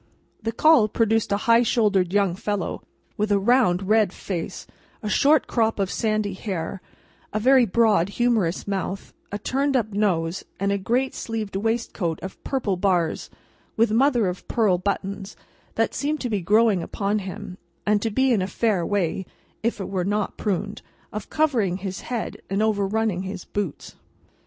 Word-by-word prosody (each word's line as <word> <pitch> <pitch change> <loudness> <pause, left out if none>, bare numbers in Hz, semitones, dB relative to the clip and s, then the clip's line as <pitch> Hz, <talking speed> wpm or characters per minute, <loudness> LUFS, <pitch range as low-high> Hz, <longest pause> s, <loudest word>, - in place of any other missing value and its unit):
The 225 +1 -2
call 285 -2 +5
produced 225 0 +1
a 200 - +3
high 230 -1 +6
shouldered 205 -6 +2
young 200 -3 +2
fellow, 205 0 -3 0.4
with 210 -1 0
a 200 - +5
round 200 -4 +3
red 215 -2 +4
face, 175 -4 -5 0.4
a 210 - -2
short 290 +6 +4
crop 225 -2 +1
of 195 -2 -1
sandy 215 -3 0
hair, 190 -1 -4 0.5
a 215 - -1
very 255 +1 +5
broad 210 -3 +3
humorous 215 -7 0
mouth, 195 -1 -3 0.2
a 205 - -2
turned 270 +5 0
up 220 -3 -1
nose, 180 -4 0 0.2
and 200 0 +1
a 200 - 0
great 245 +7 0
sleeved 220 -3 -4
waistcoat 205 -6 -1
of 190 - -8
purple 230 -9 -1
bars, 180 -4 0 0.5
with 225 -1 +3
mother 240 -1 +3
of 180 0 -4
pearl 205 -6 +2
buttons, 195 +1 -3 0.4
that - - +1
seemed 300 +2 -1
to 245 - -2
be 205 -3 0
growing 210 +1 +3
upon 205 +4 -1
him, 185 -1 -7 0.3
and 210 -1 +2
to 225 - 0
be 260 +4 +2
in 210 - +2
a 185 - -1
fair 200 -2 0
way—if 200 +4 -3
it 195 - -4
were 190 -2 -1
not 205 +2 -1
pruned—of 205 +1 -5
covering 240 - +1
his 190 -1 -5
head 240 -3 -4
and 195 +3 +1
overunning 210 -2 0
his 190 -1 -6
boots. 200 -8 -4
205 Hz, 160 wpm, -24 LUFS, 190-225 Hz, 0.5 s, high